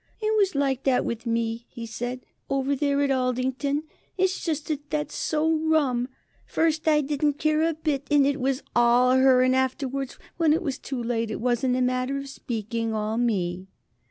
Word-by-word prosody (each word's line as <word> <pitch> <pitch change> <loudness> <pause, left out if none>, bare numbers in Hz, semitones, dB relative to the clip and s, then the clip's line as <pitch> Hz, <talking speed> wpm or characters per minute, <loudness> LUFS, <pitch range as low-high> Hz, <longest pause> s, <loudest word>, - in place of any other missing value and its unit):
"It 435 0 0
was 395 -6 +2
like 270 -2 +1
that 260 -2 +2
with 235 +1 -4
me," 230 0 -1
he 235 -2 -7
said, 245 +3 -5 0.2
"over 275 0 +1
there 285 0 +1
at 280 - +1
Aldington. 260 +3 0 0.3
It's 375 0 0
just 310 -3 -2
that 295 -1 -3
that's 300 -1 -2
so 315 +1 +1
rum. 295 -6 +1 0.4
First 320 -1 0
I 300 -1 +5
didn't 290 +1 0
care 310 +2 +1
a 325 0 +1
bit 300 -3 -2
and 290 -2 +5
it 285 +1 +1
was 265 +1 0
all 240 +1 +5
her, 260 -1 +5
and 255 0 +3
afterwards, 265 0 -1 0.2
when 325 -3 +4
it 335 +4 0
was 275 -5 -3
too 260 -3 -4
late, 230 -1 -1
it 215 - -4
was, 240 +1 0
in 255 -1 +2
a 255 - +1
manner 255 +2 0
of 275 0 -6
speaking, 230 -3 -3
all 215 +1 -1
me." 185 -6 -1
265 Hz, 190 wpm, -25 LUFS, 245-295 Hz, 0.4 s, I